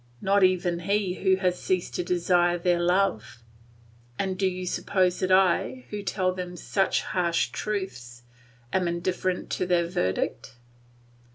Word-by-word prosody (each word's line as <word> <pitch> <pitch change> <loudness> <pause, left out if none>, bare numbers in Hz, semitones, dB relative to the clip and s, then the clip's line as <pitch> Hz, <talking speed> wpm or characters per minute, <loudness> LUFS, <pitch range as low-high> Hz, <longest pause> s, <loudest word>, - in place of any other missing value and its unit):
not 200 +1 +2
even 180 -2 +2
he 195 +1 0
who 190 -1 +4
has 180 -1 -1
ceased 185 -2 -1
to 180 - -2
desire 175 0 +2
their 175 0 +1
love. 175 - 0 0.7
And 190 -1 -1
do 190 +1 +1
you 185 0 -3
suppose 180 0 0
that 185 0 0
I, 190 +7 +2
who 210 -1 -4
tell 185 -2 0
them 180 -1 -6
such 195 +2 0
harsh 170 -2 0
truths, 125 - -5 0.5
am 185 -2 +1
indifferent 180 +1 -2
to 180 - -1
their 175 -1 +2
verdict? 120 - -2
180 Hz, 145 wpm, -26 LUFS, 175-190 Hz, 0.7 s, who